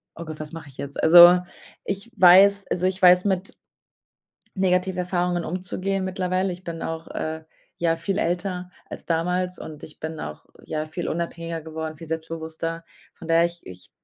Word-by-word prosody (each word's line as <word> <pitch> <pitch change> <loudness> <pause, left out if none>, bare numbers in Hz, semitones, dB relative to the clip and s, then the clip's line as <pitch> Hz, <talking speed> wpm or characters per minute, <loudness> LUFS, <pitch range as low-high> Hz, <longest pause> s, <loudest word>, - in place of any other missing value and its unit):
„Oh 170 - -8
Gott, 155 -1 -8
was 150 - -7
mache 165 -2 -9
ich 135 - -13
jetzt?“ 140 0 -5
Also, 175 +2 +9 0.5
ich 200 +4 -4
weiß 195 +2 +7
also 180 +1 +1
ich 185 +1 -3
weiß, 180 0 +7
mit 190 -2 -1 1.0
Negativerfahrungen 180 -1 0
umzugehen 185 +2 -2
mittlerweile. 185 0 -1
Ich 180 +1 -12
bin 165 -2 -6
auch, 165 0 -5
äh, 160 0 -4 0.3
ja, 165 -1 +1
viel 185 +4 -2
älter 180 0 -2 0.2
als - - -8
damals 180 +2 -1
und 155 -2 -9
ich 155 - -11
bin 160 0 -6
auch, 75 0 -7 0.2
ja, 155 0 -3
viel 165 +2 -5
unabhängiger 165 0 -4
geworden, 160 0 -6
viel 165 +2 -11
selbstbewusster. 165 +1 -5 0.3
Von 165 - -12
daher, 165 +1 +5
ich 170 0 -6
ich 90 0 -12
170 Hz, 165 wpm, -24 LUFS, 160-185 Hz, 1.0 s, Also